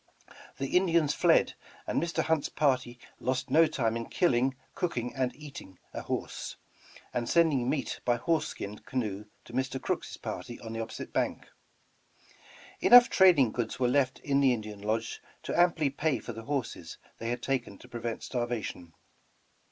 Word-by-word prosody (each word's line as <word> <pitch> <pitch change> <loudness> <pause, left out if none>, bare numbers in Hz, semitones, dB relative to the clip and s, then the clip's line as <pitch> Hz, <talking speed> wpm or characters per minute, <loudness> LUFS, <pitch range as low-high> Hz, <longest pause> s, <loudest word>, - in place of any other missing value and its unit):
The 135 +4 -3
Indians 170 -5 +3
fled, - - +4 0.3
and - - 0
Mr. 170 0 0
Hunt's 160 -3 +1
party 130 -4 +1 0.2
lost 130 0 -2
no 160 +3 +6
time 115 -6 0
in 115 0 -4
killing, 135 -6 +2 0.2
cooking 125 -9 -2
and 130 -2 0
eating 140 - -10 0.2
n - - -4
horse, - - -4 0.6
and 120 -1 -1
sending 150 -7 +3
meat 140 -2 -2
by 120 - +2
horse 160 +6 0
skin 105 +1 -6
canoe 110 -6 -3 0.2
to - - -13
Mr. 130 +1 -1
Crooks' - - -3
party 120 - -6
on 115 -1 -7
the 115 - -4
opposite 110 - -7
bank. - - -1 1.3
Enough 245 0 +8
trading 170 - +6
goods 120 0 -3
were 125 - +3
left 130 0 +2
in 140 -1 +1
the 135 -2 +5
Indian 105 -2 -8
lodge 110 +2 -2 0.2
to - - -3
amply 170 -5 +3
pay 145 -1 0
for 120 - -7
the 115 +1 -9
horses 130 - -3 0.2
they 115 - -3
had 120 0 -3
taken 135 -3 -2
to - - -15
prevent 120 -2 -4
starvation. 120 -9 -3
130 Hz, 160 wpm, -30 LUFS, 115-145 Hz, 1.3 s, Enough